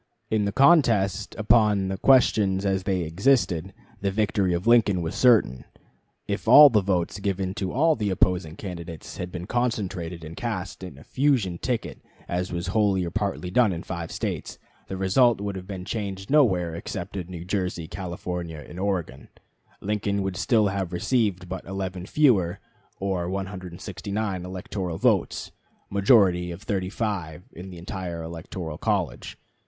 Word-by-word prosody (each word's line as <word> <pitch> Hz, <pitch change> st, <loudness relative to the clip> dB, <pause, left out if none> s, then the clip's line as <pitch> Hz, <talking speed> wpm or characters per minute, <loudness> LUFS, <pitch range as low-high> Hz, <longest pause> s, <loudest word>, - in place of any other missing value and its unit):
In 110 Hz, -2 st, +2 dB
the 100 Hz, -, 0 dB
contest 115 Hz, -, +3 dB
upon 105 Hz, -3 st, +3 dB
the 95 Hz, -, -3 dB
questions 105 Hz, -7 st, +4 dB
as 95 Hz, -1 st, +1 dB
they 95 Hz, -2 st, 0 dB
existed, 95 Hz, -, +1 dB, 0.3 s
the 100 Hz, -, +1 dB
victory 100 Hz, -2 st, +1 dB
of 85 Hz, +1 st, -1 dB
Lincoln 110 Hz, -6 st, +4 dB
was 80 Hz, -, -3 dB
certain. 110 Hz, -, +3 dB, 0.6 s
If -, -, -3 dB
all 145 Hz, -1 st, +10 dB
the 105 Hz, -3 st, +4 dB
votes 95 Hz, 0 st, -1 dB
given 95 Hz, -1 st, -2 dB
to 95 Hz, -2 st, -1 dB
all 160 Hz, +4 st, +3 dB
the 105 Hz, -3 st, -1 dB
opposing 90 Hz, -3 st, +1 dB
candidates 85 Hz, -5 st, -8 dB
had 90 Hz, 0 st, -5 dB
been 90 Hz, -1 st, -6 dB
concentrated 95 Hz, -8 st, -2 dB
and 80 Hz, +1 st, -8 dB
cast 95 Hz, -6 st, -4 dB
for 95 Hz, -, -7 dB
a 70 Hz, -4 st, -13 dB
"fusion 125 Hz, -11 st, +1 dB
ticket," 125 Hz, -3 st, -3 dB, 0.3 s
as 90 Hz, +2 st, -2 dB
was 85 Hz, -1 st, -3 dB
wholly 100 Hz, -4 st, +2 dB
or 85 Hz, -, -5 dB
partly 100 Hz, -3 st, -2 dB
done 115 Hz, 0 st, +4 dB
in 85 Hz, -1 st, -4 dB
five 85 Hz, -2 st, -5 dB
States, -, -, -4 dB, 0.3 s
the 95 Hz, -, -5 dB
result 110 Hz, +5 st, +3 dB
would 100 Hz, -1 st, -3 dB
have 95 Hz, -1 st, -7 dB
been 95 Hz, -2 st, -6 dB
changed 100 Hz, -1 st, -4 dB
nowhere 95 Hz, -, +3 dB
except 90 Hz, +3 st, -6 dB
in 90 Hz, -3 st, -4 dB
New 90 Hz, -2 st, -8 dB
Jersey, 90 Hz, -3 st, -2 dB
California, 85 Hz, -4 st, -5 dB
and 85 Hz, -, -9 dB
Oregon; 90 Hz, -10 st, -2 dB, 0.5 s
Lincoln 100 Hz, -1 st, -1 dB
would 95 Hz, -1 st, -3 dB
still 105 Hz, +2 st, +2 dB
have 95 Hz, -2 st, -3 dB
received 100 Hz, -2 st, 0 dB
but 95 Hz, +1 st, -5 dB
11 95 Hz, -1 st, -5 dB
fewer, 105 Hz, -, +3 dB, 0.4 s
or 95 Hz, -3 st, -1 dB
169 95 Hz, +1 st, -4 dB
electoral 90 Hz, -1 st, -4 dB
votes -, -, +1 dB, 0.4 s
majority 100 Hz, -4 st, +4 dB
of 85 Hz, +3 st, -8 dB
35 95 Hz, -4 st, -3 dB
in 90 Hz, +3 st, -9 dB
the 90 Hz, -, -10 dB
entire 85 Hz, -1 st, -5 dB
electoral 80 Hz, -1 st, -6 dB
college. -, -, -2 dB
95 Hz, 155 wpm, -25 LUFS, 90-105 Hz, 0.6 s, all